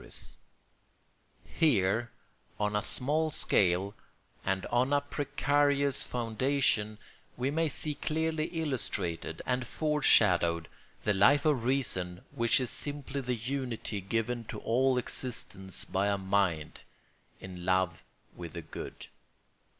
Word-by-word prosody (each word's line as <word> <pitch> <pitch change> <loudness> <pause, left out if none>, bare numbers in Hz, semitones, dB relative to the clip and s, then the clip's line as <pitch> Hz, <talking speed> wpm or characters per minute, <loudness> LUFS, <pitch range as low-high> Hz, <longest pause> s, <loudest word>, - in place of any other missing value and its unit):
] - - -40
Here, 120 - +2 0.5
on 105 0 0
a 105 - +2
small 150 +8 +2
scale 95 - +2 0.5
and 95 0 -1
on 125 +4 +1
a 145 - +3
precarious 145 -1 +1
foundation, 115 -2 0 0.4
we 130 +3 0
may 160 +1 +1
see 150 +2 -3
clearly 160 +1 -1
illustrated 130 - -3
and 125 -1 -1
foreshadowed 95 - +3 0.4
that 105 - +2
Life 140 +10 +5
of 140 -7 +2
Reason 95 -9 -1
which 115 -4 +2
is 125 -2 -2
simply 145 -1 -2
the 125 -1 -1
unity 120 -3 -3
given 115 +4 -2
to - - -6
all 130 +3 +2
existence 105 -6 -1
by 100 +2 0
a 100 -1 +1
mind 95 -5 0 0.6
in 90 -2 -9
love 95 -2 +1 0.3
with 85 -2 -8
the 85 - -6
good. 80 - -8
120 Hz, 120 wpm, -30 LUFS, 95-140 Hz, 0.6 s, Life